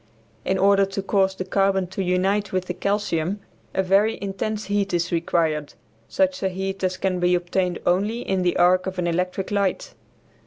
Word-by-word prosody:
In 190 - 0
order 200 +1 +4
to 195 0 -4
cause 195 -1 +1
the 185 - -4
carbon 195 0 +1
to 190 - -4
unite 190 +2 +1
with 185 -1 -1
the 180 - -3
calcium 200 -1 -1 0.4
a 190 - +2
very 200 +4 +3
intense 205 +2 -3
heat 200 -2 0
is 170 0 -1
required, 165 -3 0 0.3
such 280 -1 0
a 190 - +1
heat 190 +1 -4
as 185 0 0
can 185 -2 -1
be 180 0 +3
obtained 180 0 -1
only 205 +7 +1
in 190 -1 0
the 180 -1 +1
arc 185 +1 +4
of 190 0 -4
an 180 - -1
electric 180 +3 -1
light. 200 -2 -1
190 Hz, 185 wpm, -23 LUFS, 180-200 Hz, 0.4 s, order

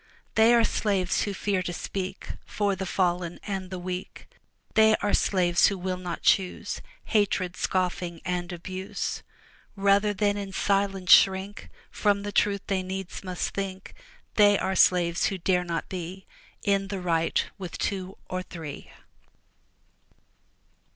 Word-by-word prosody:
They 220 +1 +6
are 235 - +5
slaves 195 -5 +1
who 205 - -1
fear 195 -2 0
to 175 - -3
speak 190 +2 -5
For 205 -2 -1
the 190 0 -4
fallen 175 -2 0
and 195 -3 -4
the 185 - -5
weak; 180 +1 -6 0.5
They 220 0 +6
are 205 -1 -1
slaves 175 -3 +3
who 200 - -1
will 185 0 -2
not 175 -2 -5
choose 185 -2 +1 0.2
Hatred, 195 -4 +1
scoffing, 180 -3 -1
and 180 0 -2
abuse, 185 +2 -4 0.5
Rather 200 +1 +3
than 205 0 +1
in 200 -1 -5
silence 195 -2 +1
shrink 195 +1 +5 0.2
From 205 -1 +1
the 205 - -4
truth 200 0 +1
they 195 -2 0
needs 190 0 -6
must 185 -1 -2
think; 195 -1 -5 0.4
They 205 -1 +6
are 190 0 -1
slaves 175 -2 +4
who 195 - -2
dare 180 0 +1
not 170 -2 -3
be 185 +1 -6 0.4
In 195 -1 +1
the 195 -1 -4
right 165 -2 +1
with 180 -3 -6
two 190 -1 -3
or 185 0 -3
three. 160 -5 -8
190 Hz, 145 wpm, -27 LUFS, 180-200 Hz, 0.5 s, They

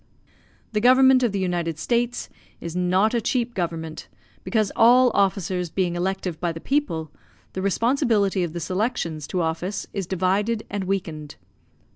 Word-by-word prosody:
The 210 -1 0
government 260 +2 +6
of 240 -4 +2
the 200 - -2
United 175 -4 -1
States 240 +6 -1 0.3
is 170 0 -6
not 185 +5 +2
a 235 - +1
cheap 240 +1 -1
government, 165 -4 -4 0.4
because 215 -4 0
all 245 +2 +6
officers 185 -3 0
being 180 0 -1
elective 180 -2 -2
by 175 -1 -1
the 165 - -7
people, 165 - -1 0.4
the 190 - -3
responsibility 205 -1 +1
of 165 -2 -4
the 175 - -4
selections 175 - -2
to 180 - -1
office 170 +4 -2
is 195 -4 -3
divided 195 +5 0
and 200 -1 -2
weakened. 165 -6 -4
190 Hz, 150 wpm, -23 LUFS, 175-230 Hz, 0.4 s, government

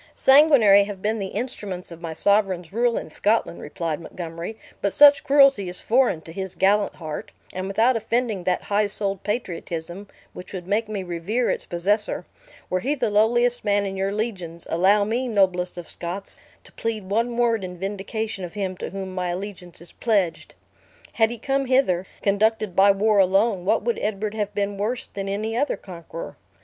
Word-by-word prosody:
"Sanguinary 265 -9 +6
have 200 -2 -8
been 215 +1 0
the 195 - -3
instruments 200 -8 -5
of 170 0 -10
my 165 -2 -5
sovereign's 190 0 +1
rule 235 +1 +1
in - - -6
Scotland," 210 0 0
replied 155 +1 -4
Montgomery; 170 +4 -7 0.2
"but 200 - 0
such 290 -1 +7
cruelty 275 -9 +4
is 180 - -5
foreign 240 -8 +2
to 165 - -11
his 190 +1 -5
gallant 205 +1 +2
heart; 155 -3 -6 0.2
and 185 +1 -4
without 225 +6 +3
offending 225 -3 -1
that 180 -1 0
high 205 +1 +1
souled 200 -2 -2
patriotism, 180 -3 -4 0.3
which 180 - -10
would 180 -2 -6
make 210 +3 0
me 205 -3 -3
revere 185 +8 -1
its - - -4
possessor, 205 +5 -1 0.4
were 185 - 0
he 275 +9 -1
the 240 -6 -1
lowliest 240 +3 +3
man 205 0 +2
in 195 0 -4
your 195 +1 -1
legions, 190 -6 -4
allow 195 +5 +4
me, 235 +5 -1
noblest 185 -5 +1
of 175 - -7
Scots, 180 +3 -7 0.2
to - - -16
plead 220 -4 -4
one 230 +4 0
word 230 -4 +2
in 180 -1 -6
vindication 200 +2 -4
of 175 +1 -7
him 190 -2 -2
to - - -5
whom 190 -1 -6
my 180 -1 -2
allegiance 180 -2 -7
is 170 - -11
pledged. 200 -8 -1 0.6
Had 225 -1 +3
he 240 - -5
come 270 +3 -1
hither, 190 -9 +2 0.2
conducted 210 -1 +1
by 195 +1 +6
war 205 +1 +3
alone, 195 0 +2
what 200 - +2
would 235 +1 -1
Edward 210 0 -2
have 210 -2 -2
been 200 -1 -2
worse 235 +5 -2
than 195 0 -6
any 215 +3 -2
other 285 +4 0
conqueror? 170 -3 -9
200 Hz, 180 wpm, -23 LUFS, 185-225 Hz, 0.6 s, such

